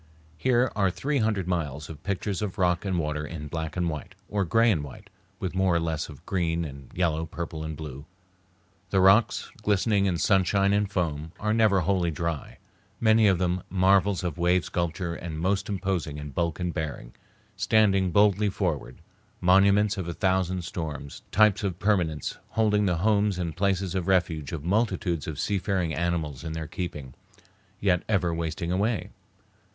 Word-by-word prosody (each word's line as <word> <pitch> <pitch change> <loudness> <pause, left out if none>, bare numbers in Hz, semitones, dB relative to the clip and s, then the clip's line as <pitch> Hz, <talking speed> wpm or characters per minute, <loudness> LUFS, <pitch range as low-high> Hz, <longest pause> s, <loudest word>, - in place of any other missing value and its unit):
Here 125 +1 +2
are 100 -2 +3
three 140 +10 -1
hundred 105 -5 0
miles 75 -5 -2
of 75 -2 -10
pictures 100 +1 -2
of 105 -3 -3
rock 90 0 +1
and 95 -2 0
water 75 -2 -1
in 75 0 -6
black 80 +1 -4
and 90 -1 +1
white, 75 -3 -5
or 105 -1 0
gray 115 +7 +4
and 80 -8 0
white, 70 - -11 0.3
with 90 - -3
more 95 -2 +2
or - - +3
less 80 -1 -2
of 75 +3 -13
green 85 -3 0
and 70 -3 -10
yellow, 80 -2 0
purple 80 -1 -5
and 80 -1 -5
blue. 70 -2 -8 0.8
The 95 - +2
rocks, 95 +4 +4
glistening 100 0 +2
in 90 -3 0
sunshine 100 +2 +3
and 100 -1 +1
foam, 80 -4 -2
are 105 +1 0
never 110 -4 +4
wholly 90 -1 +1
dry—many 85 +7 -1
of 95 -3 +4
them 90 0 0
marvels 95 +1 +3
of 90 -1 -3
wave 90 +1 +2
sculpture 85 0 -2
and 85 -2 -6
most 95 +5 0
imposing 95 -6 -2
in 75 -1 -7
bulk 85 +4 -1
and 90 -2 -2
bearing, 70 -6 -5 0.4
standing 100 -1 +3
boldly 100 +2 +3
forward, 85 - -3 0.4
monuments 100 +3 +4
of 95 -3 -3
a 85 - -4
thousand 95 -2 0
storms, 75 -4 -6
types 105 -1 +4
of 95 -4 -2
permanence, 90 -7 0
holding 105 -2 +2
the 90 -2 +1
homes 105 -3 +2
and 85 -3 -3
places 95 -1 0
of 95 -2 -2
refuge 85 -6 +1
of 80 -4 -5
multitudes 90 - 0
of 75 -3 -5
seafaring 95 -4 0
animals 85 -4 -2
in 80 -1 -4
their 80 0 -4
keeping, 75 -6 -6 0.7
yet 90 -4 +2
ever 90 -5 +1
wasting 85 +1 -3
away. 100 +1 0
90 Hz, 170 wpm, -27 LUFS, 80-100 Hz, 0.8 s, gray